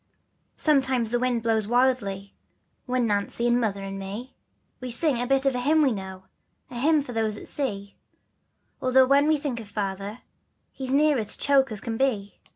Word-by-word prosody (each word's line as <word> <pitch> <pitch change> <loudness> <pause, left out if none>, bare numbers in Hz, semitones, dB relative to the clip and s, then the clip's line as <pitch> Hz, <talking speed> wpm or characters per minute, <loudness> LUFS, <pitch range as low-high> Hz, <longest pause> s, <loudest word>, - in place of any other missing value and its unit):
Sometimes 265 -6 +2
the 240 - +1
wind 245 -2 0
blows 220 -2 +1
wildly, 225 -6 0 0.5
But 250 0 0
Nancy, 210 +2 -1
and 240 0 +3
Mother, 200 -3 -2
and 195 0 -6
me, 205 +7 -7 0.5
We 255 - -6
sing 250 +1 +1
a 245 - -2
bit 270 +1 +2
of 270 - +3
a 250 - -2
hymn 305 +5 +3
we 270 - +3
know, 190 -3 -6 0.5
The 245 - -8
hymn 300 +2 +3
for 250 - -8
those 220 -2 -1
at - - -7
sea, 200 -8 -3 0.9
Although 260 0 +5
when 280 +2 +4
we 310 0 +3
think 275 -5 -3
of 220 - -9
Father, 200 +2 -4 0.6
We're 265 - -3
as 255 - -1
near 300 +1 +4
to 210 - -1
choke 270 -3 +3
as 210 - -5
can 225 -1 -4
be. 220 -7 -1
245 Hz, 190 wpm, -25 LUFS, 205-265 Hz, 0.9 s, Although